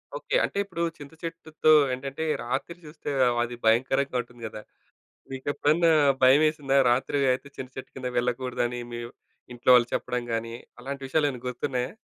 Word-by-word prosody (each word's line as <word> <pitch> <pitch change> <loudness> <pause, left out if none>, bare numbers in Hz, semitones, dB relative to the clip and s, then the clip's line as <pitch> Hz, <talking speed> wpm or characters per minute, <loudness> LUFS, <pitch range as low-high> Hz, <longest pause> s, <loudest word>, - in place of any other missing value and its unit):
Okay. - - -3
అంటే - - -2
ఇప్పుడు 180 -4 -6 0.2
చింతచెట్టుతో 160 +1 -2 0.2
ఏంటంటే, 135 +4 -4 0.2
రాత్రి 135 +8 -3
చూస్తే 150 -1 -8 0.3
అది 120 0 -5
భయంకరంగా 130 +3 +2
ఉంటుంది 120 0 -17
గదా! 110 0 -8 0.7
మీకెప్పుడన్నా 145 +5 +1 0.3
భయమేసిందా? 140 +1 +4
రాత్రి 130 +3 0 0.2
అయితే 135 +2 -5
చింతచెట్టు 130 0 -8
కింద 130 -1 -4
వెళ్ళగూడదని 125 0 -1
మీవ్ 120 0 -6 0.4
ఇంట్లో 120 +1 -1
వాళ్ళు 120 -1 +4
చెప్పడం 125 -1 -2
గాని, 115 0 -3 0.3
అలాంటి 135 +2 -6
విషయాలు 150 +2 +2
ఏమైనా 125 -2 -8
గుర్తున్నాయా? 125 0 -2
130 Hz, 135 wpm, -26 LUFS, 125-150 Hz, 0.7 s, భయమేసిందా